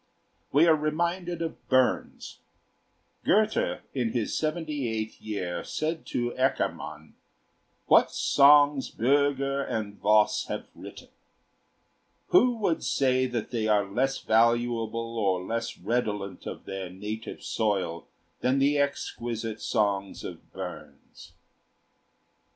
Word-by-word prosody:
We 150 Hz, +4 st, +5 dB
are 165 Hz, -2 st, +6 dB
reminded 170 Hz, +3 st, -1 dB
of 160 Hz, -, -7 dB
Burns. 130 Hz, -1 st, 0 dB, 0.8 s
Goethe 215 Hz, +2 st, +2 dB
in 120 Hz, -4 st, -1 dB
his 115 Hz, -3 st, -1 dB
seventy 155 Hz, -5 st, -2 dB
eighth 110 Hz, 0 st, -4 dB
year 95 Hz, -5 st, -4 dB
said 160 Hz, +1 st, -3 dB
to 120 Hz, 0 st, -1 dB
Eckermann: 130 Hz, +2 st, -2 dB, 0.7 s
"What -, -, +5 dB
songs 145 Hz, -1 st, +5 dB
Bürger 140 Hz, +2 st, +1 dB
and 105 Hz, -2 st, -4 dB
Voss 105 Hz, 0 st, +3 dB
have -, -, -5 dB
written! -, -, -11 dB, 1.2 s
Who 245 Hz, -1 st, +5 dB
would 195 Hz, -7 st, 0 dB
say 130 Hz, -1 st, +2 dB
that 120 Hz, -3 st, -4 dB
they 115 Hz, -3 st, -1 dB
are 105 Hz, -2 st, +3 dB
less 130 Hz, +7 st, 0 dB
valuable 115 Hz, 0 st, +1 dB
or 95 Hz, -3 st, +1 dB
less 115 Hz, +3 st, -3 dB
redolent 105 Hz, -5 st, -2 dB
of -, -, -7 dB
their 95 Hz, -2 st, -5 dB
native 105 Hz, +4 st, -7 dB
soil 95 Hz, -6 st, -1 dB, 0.3 s
than 130 Hz, +2 st, +1 dB
the 140 Hz, +1 st, +3 dB
exquisite 115 Hz, -5 st, -3 dB
songs 100 Hz, -2 st, -1 dB
of -, -, -9 dB
Burns?" -, -, -10 dB
120 Hz, 110 wpm, -27 LUFS, 110-145 Hz, 1.2 s, are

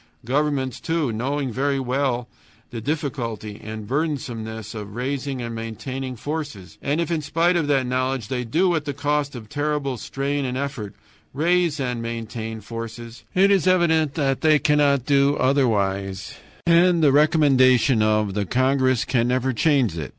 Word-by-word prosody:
Governments, 135 Hz, 0 st, 0 dB
too, 160 Hz, -6 st, -1 dB
know 125 Hz, +6 st, -2 dB
very 135 Hz, +3 st, -1 dB
well 130 Hz, -1 st, -1 dB, 0.4 s
the 115 Hz, -, -5 dB
difficulty 120 Hz, -7 st, -4 dB
and 110 Hz, 0 st, -6 dB
the -, -, -12 dB
burdensomeness 120 Hz, -7 st, -3 dB
of 105 Hz, -2 st, -7 dB
raising 135 Hz, +1 st, -3 dB
and 115 Hz, 0 st, -5 dB
maintaining 130 Hz, +4 st, -5 dB
forces, 145 Hz, -, -6 dB
and 145 Hz, +3 st, 0 dB
if 170 Hz, -1 st, -1 dB
in 165 Hz, -2 st, 0 dB
spite 165 Hz, +5 st, +1 dB
of 165 Hz, -4 st, +1 dB
that 135 Hz, -3 st, +2 dB
knowledge 130 Hz, -2 st, -1 dB
they 125 Hz, -2 st, -2 dB
do, 175 Hz, +10 st, +2 dB
at 155 Hz, -3 st, -1 dB
the 145 Hz, -2 st, -4 dB
cost 145 Hz, -1 st, -1 dB
of 115 Hz, -3 st, -8 dB
terrible 145 Hz, 0 st, -2 dB
strain 140 Hz, +4 st, -2 dB
and 130 Hz, -1 st, -2 dB
effort, 135 Hz, -8 st, -4 dB, 0.4 s
raise 170 Hz, 0 st, +2 dB
and 125 Hz, -3 st, -2 dB
maintain 115 Hz, -1 st, -5 dB
forces, 115 Hz, +2 st, -8 dB
it 195 Hz, +2 st, +5 dB
is 195 Hz, -2 st, +3 dB
evident 160 Hz, -5 st, +3 dB
that 135 Hz, -4 st, 0 dB
they 155 Hz, -1 st, +5 dB
cannot 145 Hz, -3 st, +2 dB
do 140 Hz, 0 st, +3 dB
otherwise, 100 Hz, -8 st, 0 dB, 0.3 s
and 170 Hz, 0 st, +4 dB
the 145 Hz, -, +6 dB
recommendation 135 Hz, -5 st, +4 dB
of 110 Hz, -2 st, +2 dB
the 100 Hz, -1 st, -2 dB
congress 130 Hz, 0 st, +2 dB
can 120 Hz, -2 st, +1 dB
never 130 Hz, +1 st, 0 dB
change 130 Hz, -, +2 dB
it. 75 Hz, -5 st, -5 dB
130 Hz, 160 wpm, -23 LUFS, 115-145 Hz, 0.4 s, the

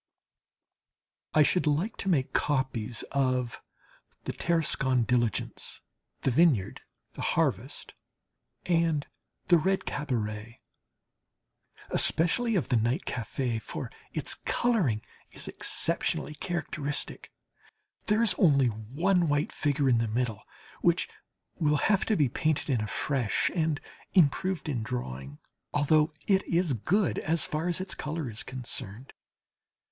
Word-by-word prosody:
I 155 Hz, -, +7 dB
should 175 Hz, +2 st, +1 dB
like 160 Hz, +10 st, +1 dB
to 195 Hz, -, -2 dB
make 140 Hz, -7 st, +1 dB
copies 130 Hz, -5 st, 0 dB
of 130 Hz, -3 st, 0 dB, 0.6 s
"The -, -, -4 dB
Tarascon 135 Hz, -7 st, +2 dB
Diligence," 120 Hz, -1 st, -1 dB, 0.4 s
"The 135 Hz, -, +1 dB
Vineyard," 130 Hz, -, +3 dB, 0.3 s
"The -, -, -7 dB
Harvest," -, -, -1 dB, 0.7 s
and 165 Hz, -4 st, +1 dB, 0.4 s
"The 175 Hz, -2 st, +7 dB
Red 190 Hz, +4 st, 0 dB
Cabaret," 115 Hz, -5 st, -3 dB, 1.3 s
especially 220 Hz, +8 st, +3 dB
of 165 Hz, -, 0 dB
the 125 Hz, -, +3 dB
night 120 Hz, -, 0 dB
café, 120 Hz, 0 st, -2 dB
for -, -, -6 dB, 0.2 s
its -, -, 0 dB
colouring 185 Hz, -, 0 dB, 0.3 s
is -, -, -8 dB
exceptionally 115 Hz, -, 0 dB
characteristic. 155 Hz, -3 st, -4 dB, 0.8 s
There 215 Hz, +2 st, +3 dB
is 230 Hz, -, +7 dB
only 140 Hz, -8 st, +5 dB
one 155 Hz, -, 0 dB
white 145 Hz, +1 st, +1 dB
figure 145 Hz, -2 st, 0 dB
in 120 Hz, -3 st, +4 dB
the 115 Hz, -, 0 dB
middle 115 Hz, -1 st, -1 dB, 0.4 s
which -, -, +2 dB, 0.5 s
will 150 Hz, -2 st, +3 dB
have 200 Hz, +5 st, +2 dB
to 220 Hz, -, +3 dB
be 150 Hz, -7 st, +3 dB
painted 155 Hz, +4 st, -1 dB
in 120 Hz, -4 st, +1 dB
afresh 115 Hz, +2 st, 0 dB
and 160 Hz, -4 st, 0 dB, 0.4 s
improved 180 Hz, +1 st, +2 dB
in 130 Hz, -6 st, -1 dB
drawing, 70 Hz, -, -5 dB, 0.4 s
although 150 Hz, +1 st, +4 dB, 0.2 s
it 195 Hz, -1 st, +3 dB
is 170 Hz, -3 st, +1 dB
good 180 Hz, -, +1 dB
as 165 Hz, +1 st, 0 dB
far 155 Hz, +3 st, -2 dB
as 175 Hz, -1 st, +2 dB
its 185 Hz, 0 st, -2 dB
colour 150 Hz, -4 st, -4 dB
is 110 Hz, +3 st, -3 dB
concerned. 125 Hz, -2 st, -5 dB
145 Hz, 120 wpm, -28 LUFS, 120-170 Hz, 1.3 s, I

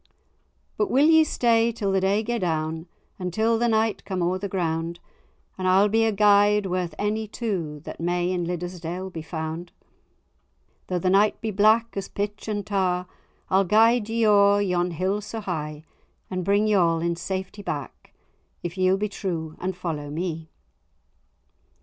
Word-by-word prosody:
"But 420 Hz, -, +1 dB
will 275 Hz, +3 st, +4 dB
ye 320 Hz, 0 st, +6 dB
stay 235 Hz, -5 st, +2 dB
till 205 Hz, -3 st, -2 dB
the 190 Hz, 0 st, +2 dB
day 200 Hz, +3 st, +2 dB
gae 240 Hz, +1 st, -2 dB
down, 160 Hz, -1 st, -2 dB, 0.3 s
Until 220 Hz, +6 st, 0 dB
the 240 Hz, -, +2 dB
night 220 Hz, -1 st, +1 dB
come 185 Hz, -3 st, -2 dB
o'er 180 Hz, +2 st, 0 dB
the 200 Hz, +1 st, -4 dB
ground, 170 Hz, -2 st, -2 dB, 0.6 s
And 185 Hz, -, -1 dB
I'll 195 Hz, +3 st, +5 dB
be 225 Hz, +2 st, +3 dB
a 220 Hz, -, +2 dB
guide 205 Hz, 0 st, +4 dB
worth 180 Hz, -3 st, -2 dB
any 215 Hz, +1 st, -1 dB
two 180 Hz, -10 st, -4 dB
That -, -, -9 dB
may 175 Hz, +1 st, 0 dB
in 180 Hz, -1 st, -1 dB
Liddesdale 180 Hz, +1 st, -5 dB
be 165 Hz, -, -6 dB
found? 160 Hz, +1 st, -5 dB, 1.2 s
Though 180 Hz, -, -1 dB
the 185 Hz, +1 st, +1 dB
night 205 Hz, +2 st, +3 dB
be 220 Hz, -, -3 dB
black 220 Hz, +3 st, +3 dB
as 195 Hz, -, -4 dB
pitch 205 Hz, +1 st, -4 dB
and 205 Hz, -2 st, -2 dB
tar, 185 Hz, -3 st, 0 dB, 0.5 s
I'll 190 Hz, +1 st, +4 dB
guide 220 Hz, +3 st, +4 dB
ye 225 Hz, 0 st, +1 dB
o'er 205 Hz, -1 st, +5 dB
yon 180 Hz, -3 st, +1 dB
hill 185 Hz, +5 st, -1 dB
so 215 Hz, +2 st, -6 dB
high; 155 Hz, -6 st, -4 dB, 0.5 s
And 185 Hz, -1 st, -2 dB
bring 200 Hz, +3 st, +2 dB
ye 215 Hz, -, +2 dB
all 170 Hz, -4 st, +3 dB
in 170 Hz, +1 st, -1 dB
safety 190 Hz, +3 st, -5 dB
back, 145 Hz, -, -6 dB, 0.5 s
If 175 Hz, +2 st, -5 dB
ye'll 185 Hz, +1 st, +3 dB
be 210 Hz, +2 st, -1 dB
true 165 Hz, -6 st, -4 dB
and 185 Hz, 0 st, -3 dB
follow 155 Hz, -5 st, -4 dB
me." 160 Hz, 0 st, -4 dB
190 Hz, 170 wpm, -25 LUFS, 175-210 Hz, 1.2 s, ye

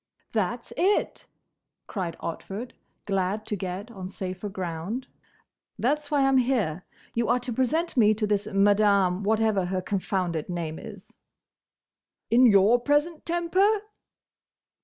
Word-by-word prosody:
"That's 225 Hz, +3 st, -2 dB
it!" 390 Hz, +4 st, +1 dB, 0.6 s
cried 180 Hz, -5 st, -4 dB
Otford, 200 Hz, +8 st, -5 dB, 0.3 s
glad 195 Hz, +2 st, -1 dB
to 210 Hz, -, -2 dB
get 195 Hz, +4 st, -5 dB
on 190 Hz, -4 st, -7 dB
safer 185 Hz, +1 st, -5 dB
ground. 190 Hz, +6 st, -4 dB, 0.7 s
"That's 290 Hz, +4 st, 0 dB
why 290 Hz, -2 st, +2 dB
I -, -, +4 dB
'm 270 Hz, -1 st, +4 dB
here. 220 Hz, -, 0 dB, 0.3 s
You 235 Hz, 0 st, 0 dB
are 240 Hz, -, +4 dB
to 245 Hz, -1 st, -4 dB
present 305 Hz, +9 st, 0 dB
me 215 Hz, -4 st, +5 dB
to 215 Hz, 0 st, -1 dB
this 205 Hz, 0 st, 0 dB
Madame—whatever 200 Hz, 0 st, +3 dB
her 185 Hz, +1 st, -1 dB
confounded 185 Hz, -5 st, -2 dB
name 165 Hz, -3 st, -4 dB
is." 205 Hz, -4 st, -12 dB, 1.1 s
"In 245 Hz, +2 st, +7 dB
your 210 Hz, +3 st, +5 dB
present 295 Hz, +5 st, 0 dB
temper?" 370 Hz, +5 st, +2 dB
210 Hz, 125 wpm, -26 LUFS, 190-250 Hz, 1.1 s, In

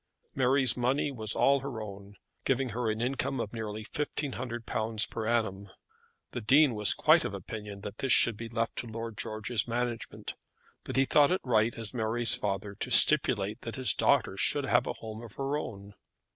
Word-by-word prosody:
Mary's 130 Hz, -1 st, +3 dB
money 130 Hz, +4 st, 0 dB
was 110 Hz, -4 st, -4 dB
all 140 Hz, 0 st, +3 dB
her 135 Hz, -4 st, -6 dB
own, 100 Hz, -1 st, -9 dB, 0.3 s
giving 135 Hz, -1 st, 0 dB
her 115 Hz, +1 st, -2 dB
an 110 Hz, +1 st, -2 dB
income 130 Hz, +1 st, -2 dB
of 110 Hz, -1 st, -4 dB
nearly 110 Hz, -1 st, -6 dB
£1500 120 Hz, -6 st, -3 dB
per 110 Hz, -1 st, -4 dB
annum. 100 Hz, -4 st, -1 dB, 0.6 s
The 120 Hz, -, -5 dB
Dean 135 Hz, +4 st, +4 dB
was 105 Hz, -1 st, +5 dB
quite -, -, +4 dB
of -, -, -4 dB
opinion 105 Hz, -2 st, -8 dB
that 105 Hz, +2 st, -8 dB
this 135 Hz, -, -1 dB
should 115 Hz, -2 st, +5 dB
be 115 Hz, +2 st, -8 dB
left 115 Hz, 0 st, -2 dB
to 120 Hz, -, -4 dB
Lord 115 Hz, 0 st, -6 dB
George's 110 Hz, +2 st, -3 dB
management, 120 Hz, -1 st, -4 dB, 0.5 s
but -, -, -6 dB
he 135 Hz, +1 st, +3 dB
thought 145 Hz, +2 st, +4 dB
it 185 Hz, -, 0 dB
right 115 Hz, -2 st, +1 dB
as 115 Hz, -2 st, -2 dB
Mary's 115 Hz, 0 st, +2 dB
father 100 Hz, 0 st, -2 dB
to -, -, -2 dB
stipulate 115 Hz, -6 st, +5 dB
that 115 Hz, -, -6 dB
his 130 Hz, -2 st, +4 dB
daughter -, -, +1 dB
should -, -, +2 dB
have -, -, +2 dB
a -, -, -2 dB
home 110 Hz, 0 st, -9 dB
of 115 Hz, -3 st, -11 dB
her 135 Hz, +1 st, -3 dB
own. 100 Hz, -8 st, -7 dB
115 Hz, 185 wpm, -29 LUFS, 110-130 Hz, 0.6 s, was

